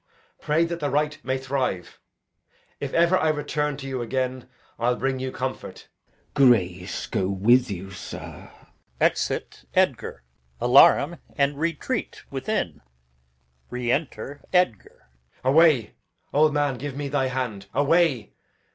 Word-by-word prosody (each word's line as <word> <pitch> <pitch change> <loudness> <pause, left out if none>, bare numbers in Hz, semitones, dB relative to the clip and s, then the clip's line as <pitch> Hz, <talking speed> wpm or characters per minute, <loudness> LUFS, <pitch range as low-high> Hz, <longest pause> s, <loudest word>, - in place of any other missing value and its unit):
Pray 160 +3 +2
that 170 0 -4
the 145 -2 -1
right 150 +2 0
may 130 +1 -1
thrive. 130 -9 -3 0.8
If - - -4
ever 170 +2 +4
I 160 - +2
return 150 -1 -1
to 135 -1 -7
you 130 -2 -3
again, 130 +1 -3 0.3
I'll 120 +1 +2
bring 135 +1 -1
you 130 0 -3
comfort. 130 +1 -6 0.4
Glou. 140 - +5
Grace 90 -5 +1
go 95 - -1
with 115 +6 +3
you, 95 0 -6
sir! 90 -3 -9 0.5
Exit - - 0
[Edgar]. - - 0 0.4
Alarum 140 +6 +6 0.2
and 140 0 +1
retreat 170 +9 -2
within. 130 - -2 0.9
Enter 125 +2 -2
Edgar, 180 - +1 0.4
Edg. - - -32
Away, 150 -4 +4 0.4
old 150 +2 +4
man! 145 -3 0
give 145 -1 -5
me 145 -1 -3
thy 135 -1 0
hand! 125 -6 -4
away! 145 - +2
135 Hz, 130 wpm, -25 LUFS, 120-150 Hz, 0.9 s, Alarum